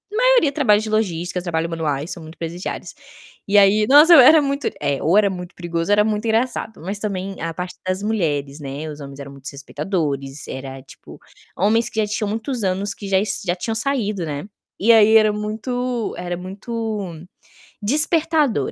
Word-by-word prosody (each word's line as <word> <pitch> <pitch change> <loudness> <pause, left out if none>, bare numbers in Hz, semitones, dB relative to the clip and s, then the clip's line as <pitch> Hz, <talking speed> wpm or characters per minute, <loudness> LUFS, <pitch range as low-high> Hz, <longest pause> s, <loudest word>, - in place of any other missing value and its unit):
maioria - - +4
trabalha 260 -8 +3
de 215 0 -5
logística, 180 -4 -1
trabalho 165 -2 -2
manuais, 155 -2 -2
são 170 - -7
muito 160 +1 -12
presidiários. 170 +2 -5 0.5
E 200 - 0
aí, 205 +1 +5
nossa, 305 +5 +8
era 305 +3 +8
muito 280 0 -1
é, 140 -1 -1
ou 165 +5 +3
era 210 -1 +4
muito 180 -2 -7
perigoso, 170 +1 -3
era 210 0 +5
muito 215 0 -1
engraçado, 225 -2 -1
mas, 195 +5 -4
também, 195 -2 -4
a 165 0 -3
parte 180 +1 -6
das 185 +1 -1
mulheres, 150 -9 -1
né, 145 +2 -6
os 150 0 -9
homens 140 0 -9
eram 140 0 -8
muito 135 -1 -11
respeitadores, 140 -1 -4
era, 135 0 -7
tipo, 135 - -14 0.4
homens 220 +5 +2
que 220 - -4
já 210 - 0
tinham 210 0 -2
muitos 225 +2 -3
anos 195 +2 -1
que 200 - -8
já 195 - +3 0.3
já 175 -1 0
tinham 220 +5 -3
saído, 220 -6 -1
né, 145 -2 -4 0.4
e 225 +4 +4
aí 220 0 +7
era 215 -1 +4
muito 230 +3 -3
era 175 0 -4
muito 200 -2 -5 0.6
despertador, 300 - +1
200 Hz, 175 wpm, -21 LUFS, 165-225 Hz, 0.6 s, nossa